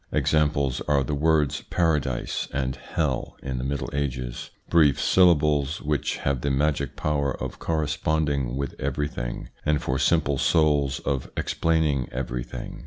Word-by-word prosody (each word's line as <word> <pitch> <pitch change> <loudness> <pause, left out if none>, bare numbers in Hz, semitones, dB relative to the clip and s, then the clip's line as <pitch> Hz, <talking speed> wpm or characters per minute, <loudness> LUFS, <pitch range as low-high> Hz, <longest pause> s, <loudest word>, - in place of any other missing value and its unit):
Examples 75 -4 +1
are 70 -2 +3
the 70 - -3
words 75 -1 +2
Paradise 75 -7 0
and 65 -1 -1
Hell 75 -6 -2
in 65 -2 -3
the - - -3
Middle 70 +1 -3
Ages, 65 -4 -3 0.2
brief 75 -4 +4
syllables 75 -5 +3
which 75 -2 -1
have 70 -3 -1
the 70 - 0
magic 70 +1 0
power 70 -3 0
of - - -5
corresponding 75 -4 0
with 70 -1 -3
everything, 70 -3 -3
and 75 -1 +2
for 65 0 -1
simple 70 0 +2
souls 75 -4 +2
of 70 -2 -2
explaining 80 -5 +1
every 60 -1 -3
thing. - - -8
70 Hz, 140 wpm, -25 LUFS, 65-75 Hz, 0.2 s, brief